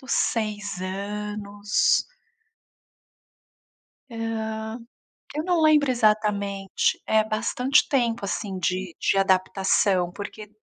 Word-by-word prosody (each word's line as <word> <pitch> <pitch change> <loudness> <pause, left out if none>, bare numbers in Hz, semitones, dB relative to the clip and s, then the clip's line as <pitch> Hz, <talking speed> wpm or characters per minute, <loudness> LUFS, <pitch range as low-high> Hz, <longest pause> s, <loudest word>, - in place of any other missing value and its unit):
dos 260 - -5
6 210 -4 -1
anos. 205 +2 -1 2.0
Hã. 220 0 -4 0.6
Eu 305 - -1
não 355 -2 +1
lembro 300 -3 +5
exatamente. 210 -4 +1
É 220 0 +4
bastante 250 +6 +1
tempo, 240 -5 +1
assim, 195 0 -3
de 185 -1 -2
de 195 - +1
adaptação, 190 -1 +2
porque 205 +2 -8
210 Hz, 90 wpm, -25 LUFS, 195-225 Hz, 2.0 s, lembro